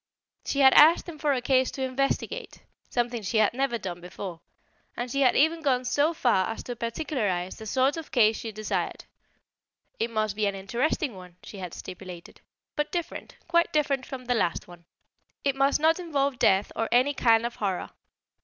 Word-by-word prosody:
She 280 - 0
had 265 -1 +7
asked 320 +5 +7
him 320 -3 -8
for 295 -1 +1
a 255 -3 -1
case 260 0 +3
to 265 - -5
investigate 260 +1 -2 0.3
(something 240 -1 -1
she 215 +3 -1
had 215 0 +3
never 265 -1 0
done 175 -5 -6
before), 180 -1 -8 0.6
and 240 0 -3
she 275 - 0
had 255 -3 +4
even 320 +3 +3
gone 255 -4 +1
so 290 +5 +2
far 240 - +2
as 225 - -5
to 245 - -5
particularize 230 - -2
the 220 - -8
sort 265 +6 +1
of 325 - -7
case 225 -6 +3
she 225 - -5
desired: 215 0 -3 0.9
"It 230 - 0
must 215 -2 -1
be 215 -1 +1
an 200 - -2
interesting 240 +7 -1
one," 180 -2 -12
she 200 - -10
had 180 -3 -6
stipulated, 180 -2 -10 0.3
"but 295 0 -1
different, 345 -1 -5
quite 340 0 +2
different 280 -4 0
from 255 -2 -7
the 245 - +1
last 175 -8 -1
one. 175 -1 -15 0.6
It 275 -1 +1
must 275 +1 +2
not 320 +3 +3
involve 280 -6 -1
death 195 +1 +3
or 225 - -1
any 255 +4 +3
kind 230 -3 +3
of 240 - -4
horror. 195 -4 -2
245 Hz, 190 wpm, -27 LUFS, 210-280 Hz, 0.9 s, had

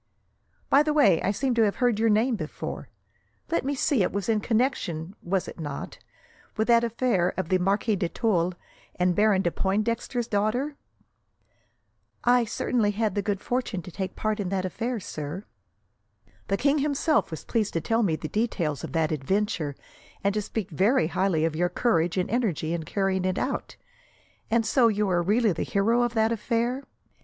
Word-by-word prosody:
"By 280 - +5
the 300 0 0
way, 200 - +5
I - - 0
seem 255 +6 0
to 235 - +2
have 205 -2 +2
heard 245 -4 +1
your 225 0 +3
name 225 +4 +3
before. 155 -7 -6 0.6
Let 335 - +1
me 280 +2 -1
see, 275 -3 +2
it 185 - +1
was 200 +2 -3
in 220 -1 +3
connection, 210 - -1
was 185 +1 -1
it - - -9
not, 145 -3 -6 0.6
with 220 +2 0
that 235 0 +6
affair 230 -6 +1
of 185 -3 -2
the 185 - +3
Marquis 200 +4 +1
de 175 -3 -1
Tulle 180 -6 0 0.4
and 180 0 +2
Baron 205 -2 +3
de 175 - +1
Pointdexter's 230 +5 -1
daughter?" 240 +8 0 1.5
"I 245 -1 +4
certainly 220 0 0
had 210 0 0
the 205 - 0
good 200 -1 -2
fortune 245 -7 -2
to 180 - -9
take 190 +1 -4
part 215 0 -1
in 195 -3 -2
that 190 -1 -1
affair, 230 +6 -3
sir." 155 +2 -6 1.0
"The 195 - +1
king 285 +5 +2
himself 295 +2 +1
was 160 - -7
pleased 220 -3 0
to 165 - 0
tell 225 +6 +1
me 180 -8 +2
the 155 - -5
details 170 - -1
of - - -6
that 160 -1 +1
adventure, 160 0 -1 0.5
and 200 0 +2
to 210 - 0
speak 205 -1 -4
very 190 - +2
highly 180 -2 +1
of 160 -1 -1
your 175 +2 +1
courage 175 -4 +1
and 180 - +1
energy 195 -9 -1
in 165 -2 -3
carrying 195 -1 0
it 185 0 0
out. 265 - -3 0.7
And 225 0 +2
so, 235 +2 +4
you 210 -2 +1
are 175 -1 +2
really 210 +5 +2
the 165 - -3
hero 225 +5 +2
of 240 -1 0
that 220 0 +3
affair? 235 +4 -1
210 Hz, 185 wpm, -26 LUFS, 180-235 Hz, 1.5 s, that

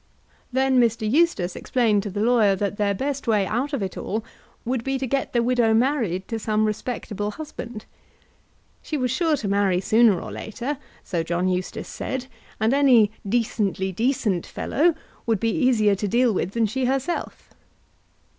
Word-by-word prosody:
Then 260 0 +3
Mr. 230 -2 +2
Eustace 225 - +2
explained 225 -5 +1
to 205 - -5
the 205 +2 -3
lawyer 225 -4 +4
that 205 +1 -2
their 200 -2 +1
best 275 +4 -3
way 210 -3 +3
out 245 +9 -1
of 275 -8 -1
it 190 - -4
all 220 +2 -3 0.4
would 245 -1 -1
be 270 +1 -1
to 265 - -2
get 270 +2 -1
the 235 -1 +2
widow 235 -2 +3
married 225 - +1
to 225 -2 -2
some 215 0 +1
respectable 215 -1 -3
husband. 240 -5 -8 1.0
She 305 - -3
was 250 -3 0
sure 320 +2 +1
to 215 - -4
marry 200 -2 +2
sooner 220 -1 +4
or - - -7
later, 255 +6 -5 0.2
so 170 -3 -2
John 175 +2 -1
Eustace 180 0 -2
said, 260 -1 -4 0.3
and 220 +3 +2
any 250 -7 +5 0.2
"decently 205 -4 0
decent" 215 -3 0
fellow 330 +2 +1 0.3
would 225 -3 +2
be 225 +2 +1
easier 235 -8 +3
to 200 +1 -2
deal 240 +3 +3
with 190 0 -2
than 230 -1 +2
she 255 +5 -1
herself. 270 +6 -3
225 Hz, 170 wpm, -24 LUFS, 205-260 Hz, 1.0 s, any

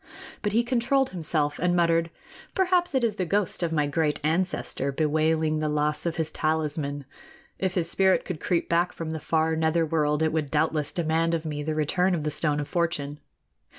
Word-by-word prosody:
But 205 - -1
he 230 +2 +3
controlled 255 +2 +1
himself 155 -4 0
and 175 +1 +1
muttered: 165 -1 +2 0.5
"Perhaps 360 -4 +2
it 260 - +2
is 220 -3 0
the 185 - 0
ghost 200 +1 0
of 170 -2 0
my 150 -2 +1
great 150 +1 0
ancestor, 160 -4 -1
bewailing 155 +1 +1
the 155 0 -1
loss 150 +2 0
of 165 - -2
his 160 -1 -2
talisman. 150 -3 -2 0.5
If 190 -1 -1
his 170 -3 +1
spirit 190 -1 +3
could 180 -5 -5
creep 170 +2 0
back 170 +1 +1
from 165 -1 -5
the 160 - -4
far 160 +1 +1
nether 160 +1 +1
world, 150 -1 +1
it 160 - +1
would 155 -3 -1
doubtless 150 0 0
demand 165 0 +1
of 160 -1 -4
me 150 -1 -3
the 155 +1 -2
return 180 +5 +1
of 155 - -3
the 150 - -1
Stone 150 -1 +2
of 145 - -3
Fortune.... 150 -5 -2
160 Hz, 195 wpm, -26 LUFS, 150-175 Hz, 0.5 s, he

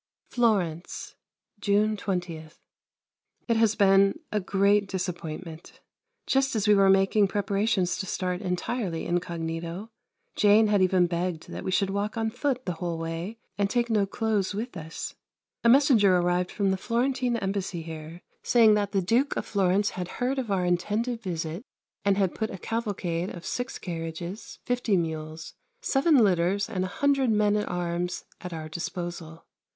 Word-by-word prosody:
Florence, 190 -9 0 0.5
June 210 +2 +2
20. 175 -6 -3 1.0
It 230 - +2
has 225 -1 +3
been 195 -1 +4
a 210 - +1
great 200 +1 +2
disappointment. 175 -3 -6 0.5
Just 270 -1 +1
as 215 -1 0
we 210 - +7
were 195 -1 +5
making 195 +2 +4
preparations 200 -1 0
to 195 - -3
start 180 +1 -2
entirely 180 -1 -2
incognito 170 +3 -3 0.4
Jane 210 +1 +5
had 205 -2 +3
even 185 -1 +4
begged 175 -1 -3
that - - -6
we - - -3
should 195 +1 +1
walk 205 +3 -2
on 225 -1 0
foot 255 +1 -1
the 180 - -1
whole 170 -2 -2
way 165 +6 -4 0.2
and 200 -1 +2
take 240 0 0
no 205 -3 +2
clothes 205 -2 -1
with 230 +4 -4
us 160 0 -6 0.5
a 235 - +5
messenger 230 -8 +5
arrived 180 0 +1
from 195 -2 0
the 190 - 0
Florentine 245 +3 0
Embassy 195 -4 -3
here, 160 +1 -8 0.2
saying 225 -3 +5
that 205 -1 0
the 195 -2 +2
Duke 240 +10 +1
of - - -2
Florence 200 0 +1
had 180 -1 -4
heard 260 +2 0
of 245 -4 -4
our 190 -2 +1
intended 210 +7 0
visit 170 -1 -4 0.4
and 200 -1 +2
had 190 -3 +1
put 220 -1 -2
a - - -6
cavalcade 190 -5 -2
of 175 -1 -9
six 245 +1 -3
carriages, 170 +3 -6
fifty 245 -5 +1
mules, 160 -1 -4 0.3
seven 305 - +3
litters, 195 -2 +3
and 185 -5 -2
a 185 - -7
hundred 275 -3 +3
men 210 -1 +3
at 210 - -1
arms 175 0 -2 0.2
at 180 - -6
our 160 -2 -5
disposal. 170 0 -6
195 Hz, 160 wpm, -27 LUFS, 175-220 Hz, 1.0 s, we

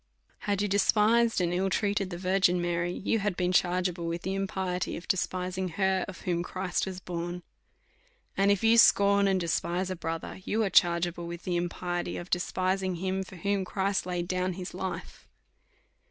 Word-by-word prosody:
Had 200 0 +1
you - - +1
despised 215 +3 +3
and 175 -1 0
ill 190 +2 +1
treated 200 -1 0
the 175 - -5
Virgin 185 0 +2
Mary, 175 0 -1
you 215 +5 -1
had 200 -3 -1
been 180 0 +1
chargeable 180 -1 +1
with 170 +1 -3
the 190 - -2
impiety 190 -2 -2
of 170 - -10
despising 185 0 -1
her, 190 -2 +2
of 185 - -9
whom 175 -1 -1
Christ 185 +1 -2
was 185 -1 -5
born. 175 0 -5 0.9
And 195 +1 +3
if 200 +1 +2
you 225 +1 +6
scorn 200 -2 +5
and 190 -1 +2
despise 175 +2 -1
a - - -2
brother, 165 +1 -5
you 220 +3 0
are 195 - -1
chargeable 170 0 +3
with 170 0 -7
the 180 - -1
impiety 175 0 -2
of 175 - -8
despising 185 +1 0
him, 190 +2 -2
for 190 0 -9
whom 200 +3 -1
Christ 190 0 -1
laid 175 -1 -2
down 185 0 -1
his 180 +1 -7
life. 185 -1 -6
185 Hz, 180 wpm, -29 LUFS, 175-195 Hz, 0.9 s, you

